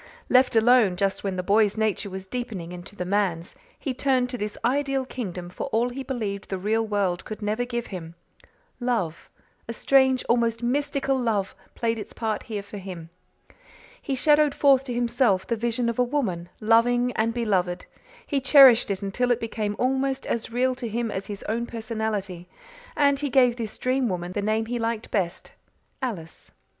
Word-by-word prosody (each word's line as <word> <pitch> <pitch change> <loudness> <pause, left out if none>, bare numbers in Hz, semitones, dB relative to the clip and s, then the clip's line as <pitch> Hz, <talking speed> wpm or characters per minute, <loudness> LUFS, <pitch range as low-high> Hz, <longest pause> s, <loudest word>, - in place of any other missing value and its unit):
Left 255 -1 +4
alone, 225 -4 +5
just 195 +1 -1
when 195 -2 -2
the 180 - -2
boy's 205 +2 +3
nature 215 -2 0
was 190 0 -7
deepening 205 -6 -5
into 180 +3 -9
the 180 - -4
man's, 185 -3 -1 0.2
he 270 - -3
turned 255 -1 +1
to 250 - -3
this 210 0 -4
ideal 270 +1 +1
kingdom 185 -9 -5
for - - -5
all 240 -2 +1
he 260 +2 -6
believed 220 -7 -4
the 190 - -2
real 215 +4 0
world 200 -5 -1
could 215 0 -7
never 215 +4 0
give 240 -1 -3
him. 165 -2 -7 0.6
Love 230 -10 -2 0.4
a 230 - -4
strange, 265 +1 +3
almost 235 -1 +1
mystical 275 +1 0
love 215 -5 -1 0.2
played 230 -1 -1
its - - -8
part 220 -2 -2
here 210 -2 -3
for 200 0 -9
him. 175 -4 -8 0.9
He 275 - -2
shadowed 295 +2 +3
forth 275 -2 +4
to 250 - -4
himself 235 -5 +2
the 235 - -1
vision 235 +1 -1
of 235 +1 -2
a - - +5
woman, 220 -11 -2
loving 240 +3 +3
and 225 +1 +1
beloved; 195 -7 -1 0.4
he 280 - -1
cherished 265 -4 +7
it 200 0 -2
until 245 +6 -1
it 245 -1 +2
became 215 -2 -3
almost 265 +1 0
as 230 -1 -2
real 255 +2 +1
to 240 - -2
him 230 0 -2
as 190 0 -4
his 205 -1 -7
own 235 +2 -2
personality 220 -6 -4 0.5
and 280 -1 +3
he 290 -1 -2
gave 250 -2 +4
this 225 -3 -6
dream 255 -1 0
woman 175 -1 -3
the 205 - -2
name 215 +2 0
he 240 +1 -3
liked 230 -1 -3
best 185 -2 -2 0.5
Alice. 185 -11 -6
225 Hz, 180 wpm, -25 LUFS, 200-250 Hz, 0.9 s, cherished